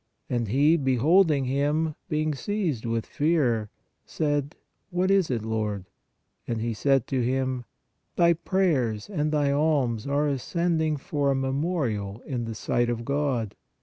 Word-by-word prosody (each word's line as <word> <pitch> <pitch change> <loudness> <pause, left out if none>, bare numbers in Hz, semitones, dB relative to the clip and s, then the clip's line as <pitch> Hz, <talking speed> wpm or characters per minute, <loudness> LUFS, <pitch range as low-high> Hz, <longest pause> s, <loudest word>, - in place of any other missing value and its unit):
And 120 -2 0
he, 145 +9 +4
beholding 145 +3 +3
him, 145 +4 0 0.2
being 155 0 0
seized 155 - -2
with 115 -1 -1
fear, 135 -9 +1 0.3
said: 145 -1 -1 0.3
What 185 +1 +1
is 195 -4 +3
it, 120 -4 -1
Lord? 105 -3 -2 0.6
And 115 -1 -2
he 115 +1 -1
said 135 +2 +2
to 130 -2 0
him: 130 0 -1 0.5
Thy 170 0 +5
prayers 160 - 0
and 155 -5 0
thy 145 -2 +2
alms 140 -6 +1
are 140 +1 +1
ascended 155 +2 0
for 145 -2 0
a 135 - +2
memorial 130 - -2
in 125 -4 -3
the 115 -1 -5
sight 120 +2 0
of 115 -1 -3
God. 135 -6 -1
140 Hz, 145 wpm, -26 LUFS, 120-155 Hz, 0.6 s, Thy